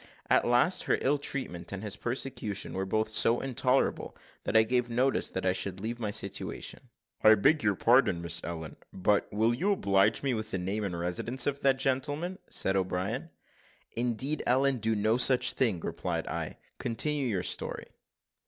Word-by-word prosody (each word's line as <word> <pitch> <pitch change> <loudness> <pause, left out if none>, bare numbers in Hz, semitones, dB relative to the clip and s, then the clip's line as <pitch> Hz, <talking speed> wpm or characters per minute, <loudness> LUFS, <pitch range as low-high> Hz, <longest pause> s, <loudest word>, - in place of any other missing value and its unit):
At - - +4
last, 125 +9 +3
her - - +2
ill 145 +2 +1
treatment, 130 -11 -3
and 100 +1 -6
his 105 -2 -3
persecution, 120 -4 -3
were 95 0 -3
both 110 +3 0
so 115 +2 +4
intolerable, 130 0 -1 0.3
that 110 - +2
I 110 - +7
gave 125 +1 0
notice 125 +3 +1
that 95 - -4
I 95 - +3
should 95 0 -1
leave 115 +4 -4
my 110 -3 -2
situation." 100 - -4 0.3
"I 110 0 +8
beg 145 +9 +3
your 105 -2 +1
pardon, 120 -5 +3
Miss 85 -1 -1
Ellen, 80 -2 -6
but 100 +2 0
will 110 +3 +2
you 195 +12 +1
oblige 100 - +2
me 135 -2 +1
with 110 -1 -4
the 95 - -2
name 95 +4 -2
and 90 -4 -3
residence 90 +9 -1
of 140 -1 -1
that 135 -1 +3
gentleman?" 145 +7 -1
said 95 - +1
O'Brien. 95 - -2 0.6
"Indeed, 125 +5 0
Ellen, 135 +2 +3
do 110 0 0
no 110 +3 +2
such 125 0 +5
thing," 115 -9 +1
replied - - -3
I; - - -5 0.2
"continue 140 +4 -1
your 95 -6 -1
story." - - -2
115 Hz, 175 wpm, -29 LUFS, 100-130 Hz, 0.6 s, I